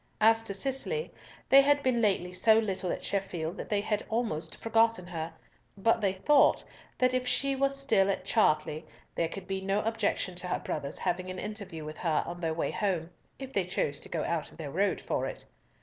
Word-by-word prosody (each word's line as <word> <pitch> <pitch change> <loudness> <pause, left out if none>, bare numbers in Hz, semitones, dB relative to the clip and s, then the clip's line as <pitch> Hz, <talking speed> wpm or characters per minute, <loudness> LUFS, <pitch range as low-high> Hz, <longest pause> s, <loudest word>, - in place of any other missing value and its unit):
As 225 +1 +5
to 200 - -4
Cicely, 270 - -1 0.4
they 275 - +8
had 285 +1 +3
been 250 -3 +2
lately 190 -4 +1
so 220 +4 +5
little 195 -4 -1
at - - -4
Sheffield 180 -4 -2
that - - -6
they 205 -1 +1
had 210 0 -1
almost 190 -9 -2
forgotten 225 -4 +2
her, 165 -2 -5 0.5
but 225 +4 +2
they 195 -2 +2
thought 275 +10 +4 0.3
that 255 0 +3
if 255 0 0
she 275 +2 +2
were 275 +1 +2
still 225 -8 +2
at 195 - -1
Chartley, 155 -7 +2 0.3
there 165 - 0
could 195 +2 -8
be 190 0 -3
no 195 +2 0
objection 220 -4 -1
to 180 - -4
her 180 - 0
brothers 140 -1 -4
having 185 0 -2
an 185 - -5
interview 200 -7 -5
with 155 0 -8
her 160 -4 +1
on 175 +1 -7
their 160 -1 -1
way 165 - -1
home, 175 -5 -1 0.3
if 270 -1 -8
they 195 - +2
chose 145 -5 -1
to - - -9
go 160 - -2
out 170 -2 -2
of - - -18
their 150 -4 -6
road 195 +5 +1
for - - -1
it. - - -6
195 Hz, 210 wpm, -30 LUFS, 175-225 Hz, 0.5 s, they